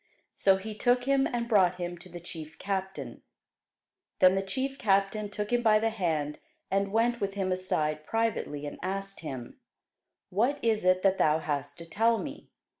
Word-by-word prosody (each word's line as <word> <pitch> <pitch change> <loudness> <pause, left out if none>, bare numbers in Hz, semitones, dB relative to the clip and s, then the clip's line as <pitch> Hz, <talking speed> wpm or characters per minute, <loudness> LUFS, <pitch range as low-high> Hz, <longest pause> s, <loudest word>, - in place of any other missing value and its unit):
So 195 -1 +4
he 215 +3 -6
took 245 +3 +2
him, 275 +1 +3
and 235 -1 -2
brought 190 -6 +4
him 175 -1 -4
to 185 +2 -12
the 175 0 -8
chief 160 -2 -8
captain. 190 -1 -4 1.0
Then 185 -1 +6
the 195 - +1
chief 260 +8 -3
captain 200 0 +1
took 210 +2 -4
him 240 - +3
by 220 -2 +5
the 225 +1 +1
hand, 160 -8 -1 0.3
and 195 0 +1
went 235 +2 +2
with 200 0 -2
him 190 -2 -1
aside 155 -5 -1
privately, 210 -8 -1
and 145 - -7
asked 195 +1 -4
him, 130 -7 -7 0.7
What 240 +10 +2
is 225 -2 +2
that 185 +1 +3
thou 155 0 +4
hast 145 -2 -3
to 170 - -9
tell 225 +6 +2
me? - - -7
195 Hz, 175 wpm, -29 LUFS, 175-225 Hz, 1.0 s, Then